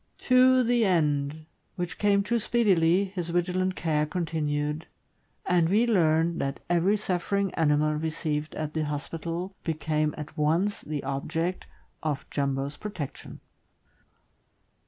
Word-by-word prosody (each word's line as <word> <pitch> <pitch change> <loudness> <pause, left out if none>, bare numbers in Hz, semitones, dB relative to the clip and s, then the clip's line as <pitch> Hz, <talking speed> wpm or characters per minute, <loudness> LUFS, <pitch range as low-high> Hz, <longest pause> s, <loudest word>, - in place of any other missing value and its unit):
To 255 0 +6
the 240 0 +2
end 155 -5 +1 0.2
— - - -44
which 175 -1 -4
came 200 -1 +3
too 235 +3 0
speedily— 195 -6 +3
his 175 -3 -3
vigilant 180 +2 0
care 150 -2 0
continued, 150 -2 -2 0.6
and 170 -2 +3
we 215 +5 +4
learned 165 -6 +2
that 135 0 -2
every 180 +5 +3
suffering 195 0 -1
animal 155 -1 +2
received 155 -1 -2
at 155 -1 -4
the 155 -1 -1
hospital 165 +5 -4
became 155 -2 -1
at 150 0 -7
once 165 +7 +1
the 150 -2 -4
object 160 +6 -2 0.3
of 150 -3 -3
Jumbo's 140 0 -1
protection. 180 -10 -7
165 Hz, 125 wpm, -27 LUFS, 150-185 Hz, 0.6 s, To